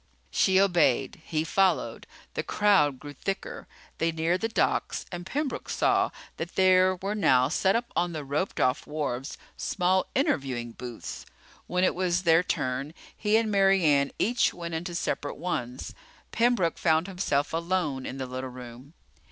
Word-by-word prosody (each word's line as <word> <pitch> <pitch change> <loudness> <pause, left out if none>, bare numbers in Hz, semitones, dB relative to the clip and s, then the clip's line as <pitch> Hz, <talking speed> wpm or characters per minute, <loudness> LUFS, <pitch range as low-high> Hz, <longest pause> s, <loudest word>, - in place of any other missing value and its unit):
She 190 -1 +3
obeyed. 175 -3 +2
He 155 -1 -1
followed. 190 +3 +1 0.3
The - - -1
crowd 190 -10 +3
grew 145 +2 -9
thicker. 195 +7 -5 0.3
They 165 0 +2
neared 165 +3 0
the 225 - +1
docks - - 0
and 175 0 -6
Pembroke 285 +4 -3
saw - - +2 0.3
that 165 +2 -6
there 185 0 +5
were 195 +3 -3
now 130 -11 +3
set 190 +4 +2
up 235 +1 -2
on 175 0 +1
the 155 -3 -5
roped 145 +7 -2
off 130 +1 +1
wharves 145 -3 -3 0.2
small 185 0 +1
interviewing 130 - 0
booths. 120 0 -8 0.4
When 180 +1 0
it 185 - +3
was 180 0 0
their 165 -1 +5
turn, 135 -2 -2 0.2
he 210 0 +2
and 225 -1 0
Mary 195 -2 +4
Ann 140 -2 +4
each 235 +2 +1
went 170 -1 -6
into 170 +2 -4
separate 145 -4 -2
ones. 130 -7 -4 0.4
Pembroke 230 -7 +2
found 160 0 +3
himself 180 -7 -1
alone 165 -5 -1
in 135 - -6
the 135 - -3
little 130 +1 -5
room. 125 +3 -11
170 Hz, 160 wpm, -27 LUFS, 140-190 Hz, 0.4 s, there